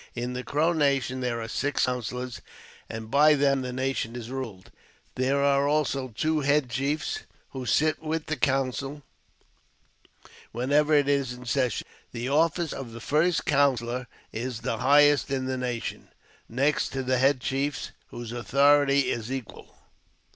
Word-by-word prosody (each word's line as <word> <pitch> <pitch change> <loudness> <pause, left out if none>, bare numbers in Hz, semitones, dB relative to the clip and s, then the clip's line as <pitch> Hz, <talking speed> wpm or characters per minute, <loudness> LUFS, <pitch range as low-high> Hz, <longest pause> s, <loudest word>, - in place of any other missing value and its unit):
In 120 +1 -3
the 125 0 -4
Crow 155 +6 +1
nation 140 -4 +1
there 125 -2 -2
,are 115 - -5
six 145 +5 0
counsellors, 125 0 -4 0.5
and 110 0 -7
by 150 +2 +6
them 140 -1 +2
the 125 -1 -4
nation 130 -2 -2
is 120 0 -7
ruled. 115 -8 -6 0.4
There 135 +2 +1
I - - +4
are 140 +1 +2
also 145 -3 0
two 155 +7 0
head 140 -2 +1
chiefs, 145 - -1 0.3
who 130 -2 -6
sit 155 0 +2
with 160 0 -2
the 155 - -2
counsel 135 0 -1 1.5
whenever 145 +6 +2
it 145 -1 +3
is 140 -3 +1
in 125 0 -11
session. 125 -2 0 0.3
The 120 +2 -3
office 160 +2 +1
of 115 -4 -7
first 160 +3 +2
counsellor 125 -3 +1 0.2
is 115 +1 -4
the 115 - -2
highest 145 +1 +5
in 130 -1 -1
the 130 0 -1
nation, 125 -2 -4 0.4
next 135 +5 +1
to 135 -1 -2
the 130 0 +1
head 135 0 +3
chiefs, 135 +1 -2 0.2
whose 120 -1 -8
authority 140 +4 +3
is 115 +1 -4
equal. 130 -4 -7
135 Hz, 155 wpm, -27 LUFS, 125-145 Hz, 1.5 s, by